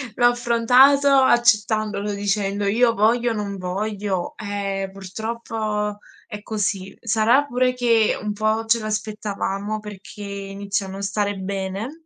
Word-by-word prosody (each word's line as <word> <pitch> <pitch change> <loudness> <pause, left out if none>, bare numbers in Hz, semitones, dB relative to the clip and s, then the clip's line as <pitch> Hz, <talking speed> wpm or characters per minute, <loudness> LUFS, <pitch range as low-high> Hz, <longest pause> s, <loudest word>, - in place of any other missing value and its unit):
L'ho 240 - +5
affrontato 245 +4 +4
accettandolo, 215 -5 +3
dicendo: 200 0 -1
"Io 230 +3 +3
voglio, 235 +3 +2
non 205 -2 -4
voglio, 195 0 -3
eh, 200 -2 -3
purtroppo 210 +1 -4 0.3
è 210 -2 -7
così." 205 -3 -3
Sarà 230 +5 +3
pure 250 -1 +1
che 230 -3 +2
un 210 0 -3
po' 215 +2 0
ce 230 +1 +3
lo 215 - -5
aspettavamo, 210 -1 -3
perché 210 0 -10
iniziò 200 0 -4
a - - -8
non 195 +1 -7
stare 205 0 -1
bene, 195 - -5
210 Hz, 130 wpm, -22 LUFS, 200-230 Hz, 0.3 s, L'ho